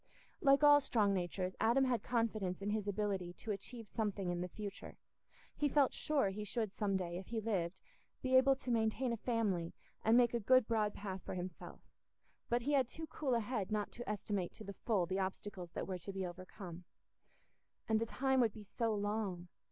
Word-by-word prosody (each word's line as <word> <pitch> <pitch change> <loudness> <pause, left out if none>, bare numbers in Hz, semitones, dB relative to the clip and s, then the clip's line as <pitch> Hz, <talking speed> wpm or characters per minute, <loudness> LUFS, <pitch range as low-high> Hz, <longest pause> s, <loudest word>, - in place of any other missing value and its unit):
Like 275 -2 +5
all 290 0 +8
strong 210 -6 +2
natures, 185 0 -2
Adam 240 +4 +4
had 245 -4 +1
confidence 215 -6 0
in 205 - 0
his 210 -1 -1
ability 195 -3 -1
to 215 - -5
achieve 220 +3 -6
something 200 -4 -1
in 175 0 -2
the 180 - -2
future; 200 +2 -7 0.6
he 295 - +1
felt 275 -1 +4
sure 285 -9 +1
he 205 +2 -4
should 215 -1 -2
some 200 -3 +1
day, 175 -1 -3
if 190 - -10
he 230 - -2
lived, 190 -5 -1 0.4
be 260 0 +2
able 265 +1 +7
to 260 -2 -4
maintain 235 +2 +1
a - - -2
family 205 -8 0 0.3
and 225 +2 +5
make 240 -1 +5
a 235 - +1
good 255 +2 +5
broad 215 -3 +1
path 190 -2 -5
for - - -5
himself; 180 -1 -6 0.7
but 240 0 +1
he 285 - 0
had 265 -4 +4
too 320 +5 -7
cool 280 -4 -1
a 230 - +2
head 215 -3 -2
not 210 -1 -1
to 240 -1 -7
estimate 205 -3 -2
to - - -10
the 200 - -6
full 200 -4 +1
the 190 +3 -1
obstacles 190 -2 -4
that - - -3
were 185 -1 -4
to 195 - -6
be 190 -1 -3
overcome. 180 0 -8 1.0
And 220 0 +2
the 230 - 0
time 265 +2 +1
would 230 -4 +3
be 215 - -9
so 220 +2 -1
long! 205 -4 -2
210 Hz, 205 wpm, -36 LUFS, 190-240 Hz, 1.0 s, all